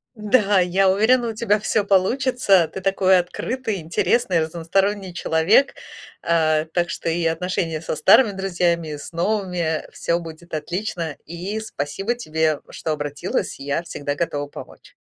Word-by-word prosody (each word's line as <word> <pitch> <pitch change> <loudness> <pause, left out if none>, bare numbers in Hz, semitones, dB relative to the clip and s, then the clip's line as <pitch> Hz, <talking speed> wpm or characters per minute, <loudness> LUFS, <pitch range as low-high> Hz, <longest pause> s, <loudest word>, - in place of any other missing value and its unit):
Да, 210 -3 +3
я 190 +2 +3
уверена, 230 +6 +3
у 225 - -3
тебя 215 -1 +1
всё 210 0 0
получится. 200 -2 +3
Ты - - -4
такой 190 0 +3
открытый, 215 +2 -3
интересный, 180 +4 +1
разносторонний 180 +4 -1
человек, 175 +11 +3 0.5
э, 155 -2 +2
так 175 -1 +1
что 165 - -3
и 165 +1 -1
отношения 165 -1 -1
со 160 - -4
старыми 215 +7 +6
друзьями, 175 -4 -1
и - - -5
с 150 - -9
новыми, 175 -3 -1
всё 170 +1 -1
будет 165 +1 -11
отлично. 170 0 -3
И 180 +6 -5
спасибо 195 - -3
тебе, 160 -8 -1
что 160 - -4
обратилась. 145 -1 -3
Я 140 +4 -2
всегда 145 -3 -4
готова 145 -2 -2
помочь. - - -12
180 Hz, 145 wpm, -22 LUFS, 160-205 Hz, 0.5 s, старыми